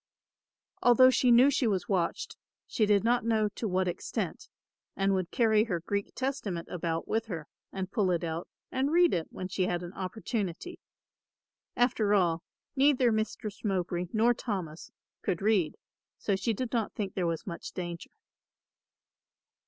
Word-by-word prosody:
Although 255 +1 +7
she 250 0 +3
knew 245 +4 +7
she 260 -3 +1
was 190 -4 0
watched, 180 -4 -1 0.3
she 215 - +1
did 205 -2 +4
not 240 +1 +2
know 220 -2 +2
to 220 +2 -4
what 185 -1 +1
extent 175 - -4 0.5
and 195 0 +2
would 185 -2 -1
carry 220 -2 +3
her 180 -7 -1
Greek 200 +4 -3
Testament 240 -11 -3
about 165 -2 -2
with 225 +1 -1
her 165 -7 -5 0.2
and 190 0 -4
pull 205 -6 +1
it 175 -2 0
out 165 +1 -3 0.2
and 265 +2 0
read 345 0 +5
it 165 -2 -1
when 185 - -6
she 185 0 -1
had 175 0 -1
an 175 +1 -7
opportunity. 200 - -4 1.0
After 220 -4 +2
all, 170 -4 +2 0.3
neither 270 -3 +4
Mistress 215 -1 -3
Mowbray 180 -3 -1
nor 230 +2 +4
Thomas 185 -10 -5 0.3
could 180 -4 -1
read, 195 -7 +1 0.4
so 200 - 0
she 210 +5 0
did 250 +2 -3
not 230 -3 0
think 200 -3 -4
there 180 -3 0
was 165 -1 -2
much 170 -4 -6
danger. 175 -2 -6
200 Hz, 160 wpm, -30 LUFS, 180-230 Hz, 1.0 s, Although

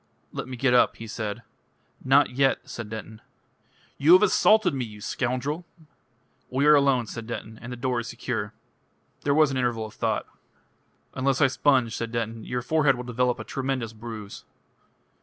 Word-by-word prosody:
"Let - - -5
me 130 -1 -7
get 125 0 +2
up," 125 - +4
he 115 - -9
said. 105 -2 -5 0.6
"Not 135 +1 +4
yet," 135 +1 +1
said 115 -3 -7
Denton. 110 0 -8 0.8
"You 150 +5 +6
have 185 - +7
assaulted 210 -2 +4
me, 130 -2 -2
you 105 -3 -9
scoundrel!" 130 - -2 0.9
"We 135 +3 +1
are 150 - +8
alone," 140 -4 +3
said 115 0 -7
Denton, 110 -1 -7
"and 120 - -8
the - - -4
door 125 0 -1
is 115 - -5
secure." - - -4 0.7
There 140 0 +1
was 155 -2 +4
an 135 - -2
interval 120 -3 0
of 110 - -10
thought. - - -1 0.9
"Unless 135 0 0
I 145 - +6
sponge," 130 -3 +2
said 115 -1 -4
Denton, 115 -1 -3
"your 125 -1 -3
forehead 150 -1 +3
will 125 - -6
develop 125 0 0
a - - -5
tremendous 130 -4 -3
bruise." 110 -2 -8
125 Hz, 175 wpm, -26 LUFS, 115-135 Hz, 0.9 s, are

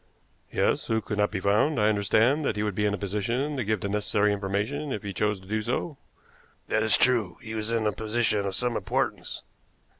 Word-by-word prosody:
"Yes, - - +1
who 110 0 +1
cannot 105 -1 0
be 105 - -3
found. 105 +9 +2
I 105 - +4
understand 110 +7 +3
that 125 - 0
he 105 - -1
would 105 -1 -1
be 105 +2 +1
in 100 - 0
a - - -7
position 115 +9 -2
to 130 - -1
give 105 -2 -1
the 100 - -2
necessary 105 0 +1
information 105 +9 -2
if 105 - -3
he 100 -1 -4
chose 105 +1 0
to 95 - -16
do 110 +2 -1
so?" 130 +6 -3 0.7
"That 110 - +2
is 110 -1 +5
true. 120 -8 +2
He 110 -3 -8
was 110 0 -3
in 115 -1 0
a 105 - +3
position 110 -1 0
of 95 - -3
some 120 +2 0
importance." 95 - -2
105 Hz, 215 wpm, -27 LUFS, 100-115 Hz, 0.7 s, is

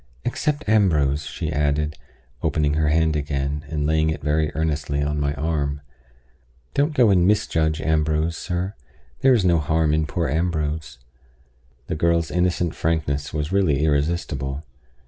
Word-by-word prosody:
"Except 150 +3 -1
Ambrose," 80 -9 +2
she 80 - -4
added, 75 +1 0 0.5
opening 75 -1 +1
her 75 0 +1
hand 80 0 +2
again, 70 0 -2
and 75 -1 -2
laying 80 +1 +2
it 80 - -4
very 75 +1 +1
earnestly 75 -2 -1
on 75 +1 -1
my 70 0 0
arm. 70 -2 -2 0.9
"Don't 145 +2 +1
go 120 -6 +5
and 90 -2 +4
misjudge 80 -6 +1
Ambrose, 80 +1 +1
sir. 90 +3 -3 0.5
There 130 -1 +5
is 105 -6 +1
no 85 -2 +4
harm 80 0 +1
in 80 0 +1
poor 85 +2 -1
Ambrose." 80 -3 -2 0.9
The - - -4
girl's 85 +1 +1
innocent 90 -1 +1
frankness 75 -3 -1
was 75 +1 -3
really 80 -7 +2
irresistible. 70 -2 -1
80 Hz, 145 wpm, -23 LUFS, 75-85 Hz, 0.9 s, go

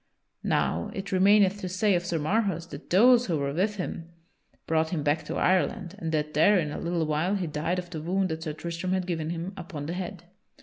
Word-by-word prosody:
Now 85 +1 0
it 195 0 -5
remaineth 200 +1 +4
to 185 - -3
say 190 +3 +2
of 175 -1 +1
Sir 170 - 0
Marhaus 175 +1 0
that 140 - -9
those 240 +6 +6
who 165 -4 0
were 140 -1 -2
with 200 +6 0
him 170 -3 -5 0.6
brought 160 0 +1
him 160 -4 -2
back 150 +2 +1
to - - -4
Ireland 180 -1 +1
and 160 -1 -3
that 150 -1 -1
there 195 +7 +5
in 155 -4 -1
a - - -5
little 170 -1 -1
while 155 +6 0
he 190 -3 -1
died 160 +3 -2
of 180 -1 -5
the 160 -3 -5
wound 185 +3 0
that 160 0 -4
Sir 155 -2 -4
Tristram 170 +3 -3
had 185 -1 0
given 165 -3 -2
him 170 +3 -4
upon 170 -6 -7
the 165 - -3
head. 180 -1 -5
175 Hz, 225 wpm, -27 LUFS, 160-190 Hz, 0.6 s, those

